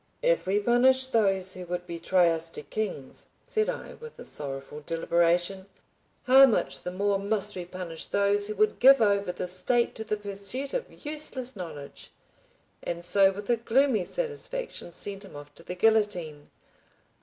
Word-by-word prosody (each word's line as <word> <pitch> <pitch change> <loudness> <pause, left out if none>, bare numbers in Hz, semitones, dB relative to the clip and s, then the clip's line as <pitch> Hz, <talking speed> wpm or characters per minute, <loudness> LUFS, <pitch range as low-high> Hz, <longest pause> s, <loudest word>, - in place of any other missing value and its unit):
"If - - +2
we 200 +2 +2
punish 255 +4 +4
those 195 -7 +1
who 185 - -8
would 180 0 -4
betray 170 +1 +2
us 165 0 -2
to 155 - -9
Kings," 190 -9 -5 0.2
said 435 -1 0
I, - - -5
with 465 0 -12
a - - -10
sorrowful 140 +1 -6
deliberation, 175 +4 +1 0.6
"how 270 +2 +8
much 230 - -1
the - - -4
more 200 +2 0
must 205 0 0
we 180 -1 -5
punish 175 -2 -7
those 200 0 +1
who 215 - -4
would 215 +1 +1
give 270 +1 +8
over 200 -3 +2
the 180 +1 -4
State 210 +7 +1
to 220 - -5
the 215 -1 -2
pursuit 205 +6 -3
of - - -5
useless 285 -4 -4
knowledge"; 155 -7 -9 0.7
and 170 0 -4
so 195 +2 +4
with 200 +1 -8
a 240 - +3
gloomy 235 -1 +2
satisfaction 485 - -5
sent 195 +3 -5
him 195 - -13
off 145 0 -11
to - - -14
the 180 - -7
guillotine. 180 -8 +1
200 Hz, 165 wpm, -27 LUFS, 175-235 Hz, 0.7 s, how